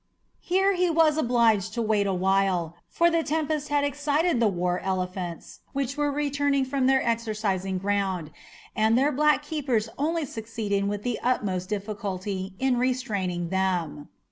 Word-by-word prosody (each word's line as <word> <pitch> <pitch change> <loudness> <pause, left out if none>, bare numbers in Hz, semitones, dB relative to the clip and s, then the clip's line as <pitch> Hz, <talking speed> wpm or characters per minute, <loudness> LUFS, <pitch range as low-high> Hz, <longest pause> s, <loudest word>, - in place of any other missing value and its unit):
Here 385 +2 +2
he 360 -1 +1
was 320 -2 +4
obliged 230 -7 +2
to 235 - 0
wait 210 -2 +1
awhile, 190 -3 +1
for 340 0 +3
the 330 0 +2
tempest 310 -1 -1
had 290 -1 +2
excited 290 +1 +1
the 230 - +4
war 180 -2 0
elephants 185 -2 -4
which 275 -1 -2
were 295 -1 0
returning 285 -1 0
from 260 0 0
their 265 -2 +3
exercising 210 -5 -1
ground, 190 -4 -1 0.4
and 220 +2 +3
their 280 +3 +3
black 300 +1 +3
keepers 265 -8 -1
only 320 +2 0
succeeded 220 -4 -3
with 205 0 -4
the 245 -2 -2
utmost 195 -7 -1
difficulty 200 -2 -4
in 265 -2 +1
restraining 205 -9 -1
them. 180 -6 -1
225 Hz, 145 wpm, -26 LUFS, 190-285 Hz, 0.4 s, was